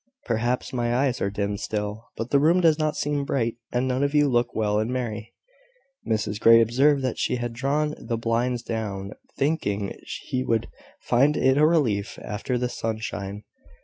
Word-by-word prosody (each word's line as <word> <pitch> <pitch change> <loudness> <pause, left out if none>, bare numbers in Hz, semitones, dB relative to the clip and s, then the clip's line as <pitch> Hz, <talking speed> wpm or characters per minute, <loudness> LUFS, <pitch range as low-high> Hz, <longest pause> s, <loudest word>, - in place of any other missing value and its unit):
Perhaps 120 +3 -1
my 120 -1 0
eyes 130 -1 +1
are 100 - +1
dim 100 0 -2
still; 105 +1 -4
but 115 +2 -4
the 140 - +5
room 165 +5 +4
does 165 -3 +4
not 155 -1 0
seem 145 -1 -1
bright, 115 -5 -1
and 125 +1 0
none 130 +1 0
of 140 +1 0
you 145 -1 +5
look 120 -2 +1
well 105 -1 +1
and 110 +3 -1
merry." 115 -4 -4 0.7
Mrs 105 -1 -1
Grey 115 +1 +7
observed 135 +5 +3
that 130 - -2
she - - 0
had 120 -1 -3
drawn 145 +5 0
the 115 - -3
blinds 120 +1 0
down, 105 -4 -4 0.3
thinking 105 -10 -1 0.3
he 130 0 -1
would 115 -3 0 0.3
find 140 +5 +3
it 130 0 +3
a 150 +2 +5
relief 115 -11 +1
after 115 +4 -2
the 125 +1 0
sunshine. 110 -3 -4
120 Hz, 180 wpm, -25 LUFS, 110-135 Hz, 0.7 s, Grey